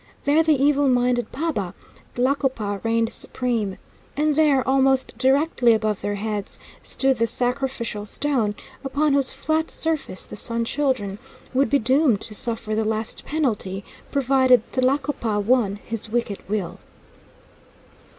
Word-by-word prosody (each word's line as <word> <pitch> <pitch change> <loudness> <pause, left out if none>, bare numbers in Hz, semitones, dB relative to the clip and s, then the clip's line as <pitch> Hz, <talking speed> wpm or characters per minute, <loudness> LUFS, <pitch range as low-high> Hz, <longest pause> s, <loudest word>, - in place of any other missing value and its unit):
There 295 +3 +4
the 315 -1 +3
evil 285 0 +3
minded 245 -1 +1
paba, 260 - -3 0.4
Tlacopa, 250 -6 0
reigned 230 0 +1
supreme. 230 -6 -1 0.4
And 300 0 +2
there, 285 -4 +3
almost 265 -1 +2
directly 265 -1 +3
above 215 -2 -1
their 205 0 -2
heads, 210 -1 -3 0.2
stood 265 -1 +1
the 230 - +2
sacrificial 245 -4 -1
stone, 235 -6 -1 0.3
upon 285 +2 +1
whose 275 -2 +2
flat 315 +1 -1
surface 315 -12 -2
the - - -9
Sun 230 +2 0
Children 230 -8 -1 0.3
would 265 -1 +2
be 280 - +4
doomed 260 -2 +3
to 215 - -4
suffer 225 0 -1
the 220 +1 +1
last 220 0 -2
penalty, 215 -10 -1 0.3
provided 260 -3 +4
Tlacopa 255 -4 0
won 210 -2 +2
his 225 -1 -5
wicked 230 -3 -1
will. 205 -4 -3
250 Hz, 130 wpm, -23 LUFS, 215-275 Hz, 0.4 s, There